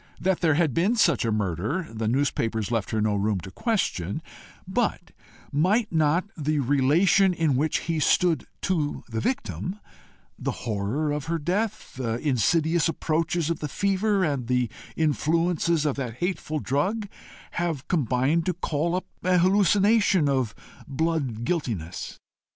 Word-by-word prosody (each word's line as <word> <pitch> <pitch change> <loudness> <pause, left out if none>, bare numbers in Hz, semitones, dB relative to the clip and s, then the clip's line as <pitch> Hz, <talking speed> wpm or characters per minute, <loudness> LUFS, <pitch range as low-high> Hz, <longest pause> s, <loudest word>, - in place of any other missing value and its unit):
That 190 -1 +1
there 160 -4 +3
had 160 -4 +2
been 190 - +2
such 220 - +3
a 115 - +1
murder, 105 - -1
the 110 0 -2
newspapers 115 -4 0
left 115 -4 -1
her 110 - 0
no 105 0 +1
room 100 0 0
to 95 - -9
question 100 - -1 0.4
but - - -1 0.4
might 200 - +2
not 160 +2 +2
the 155 -1 -1
relation 150 +8 +3
in 160 -5 +1
which 150 +4 +1
he 165 -1 -2
stood 160 -2 +2 0.2
to 155 -6 -1
the 115 -2 -3
victim 250 - -2 0.6
the - - -4
horror 115 +8 -1
of 145 -1 -3
her 165 +1 -1
death, 200 +8 -2
the 115 -3 -1
insidious 155 +5 +2
approaches 165 0 0
of 165 - -2
the 150 - -3
fever, 200 +4 +1
and 140 -7 -1
the 125 -2 +1 0.2
influences 165 +1 +1
of 145 -3 0
that 125 -4 -4
hateful 175 0 -2
drug, 185 - -1 0.4
have 165 -5 -2
combined 145 - +1
to 180 - 0
call 165 0 -1
up 185 - -2 0.2
an 180 0 +3
hallucination 200 -1 +4
of 130 -6 0 0.3
blood 140 -6 -1
guiltiness? 115 - -3
155 Hz, 145 wpm, -25 LUFS, 125-175 Hz, 0.6 s, hallucination